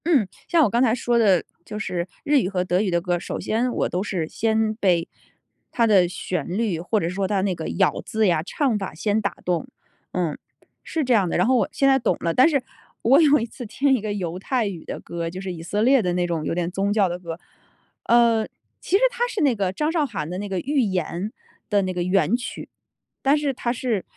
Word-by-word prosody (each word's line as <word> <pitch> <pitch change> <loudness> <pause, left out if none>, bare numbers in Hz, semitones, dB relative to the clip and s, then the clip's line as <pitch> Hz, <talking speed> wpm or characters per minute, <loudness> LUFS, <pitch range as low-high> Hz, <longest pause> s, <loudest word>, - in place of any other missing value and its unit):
嗯， 285 - +3 0.2
像 335 -2 +4
我 240 - +3
刚 235 +4 +1
才 235 -3 +3
说 240 -1 0
的 195 -7 +4 0.2
就 210 - -7
是 180 -4 -3 0.2
日 290 -1 +4
语 185 - -1
和 185 -2 -1
德 180 +1 +1
语 210 - 0
的 175 -1 +2
歌， 175 0 -1
首 - - -5
先 240 +3 0
我 - - -1
都 180 - -1
是 185 -6 -2
先 220 +3 0
被 180 -6 +1 0.6
它 235 - +2
的 195 -5 +5
旋 180 +1 -4
律 215 -8 0
或 180 +6 0
者 165 - -1
说 190 +2 -1
它 200 -1 0
那 190 -1 0
个 165 -2 -5
咬 190 0 +1
字 220 -1 +1
呀、 170 -4 +2
唱 250 - 0
法 195 - -5
先 210 +6 0
打 200 - -2
动。 175 -3 -1 0.5
嗯， 170 -5 -1 0.5
是 320 - -2
这 255 -2 +2
样 200 -6 +3
的， - - 0
然 180 - +3
后 260 - +4
我 240 - +1
现 275 - +2
在 270 0 +5
懂 240 - 0
了， 165 - -1
但 260 +6 +6
是 280 -4 +1 0.4
我 270 +7 +6
有 295 -2 +5
一 230 - -2
次 240 - -9
听 270 +6 +1
一 245 - -2
个 215 0 -3
犹 180 -3 -4
太 245 +3 0
语 180 -5 -6
的 - - -5
歌， 170 -1 -5
就 185 +2 -7
是 190 -1 -4
以 165 - -8
色 205 +5 -1
列 260 +1 +5
的 180 -3 -1
那 175 0 +1
种 170 -3 -2
有 - - -2
点 175 -1 -1
宗 195 +2 -1
教 205 -2 +3
的 175 0 -4
歌。 170 -1 -7 0.6
嗯， 235 -2 +3 0.3
其 - - 0
实 - - -4
它 485 0 -1
是 430 - -3
那 275 -5 +3
个 195 -3 -1
张 300 +10 -1
韶 325 -2 +1
涵 200 - -4
的 180 +1 -4
那 205 0 -5
个 190 - -2
《寓 285 0 +2
言》 190 -7 0 0.6
的 205 -2 +2
那 185 0 -2
个 180 - -2
原 190 +5 +2
曲。 245 0 -6 0.5
但 275 +2 +4
是 290 -2 -1
它 240 -1 -2
是， 235 -5 -1
205 Hz, 260 characters per minute, -23 LUFS, 180-245 Hz, 0.6 s, 但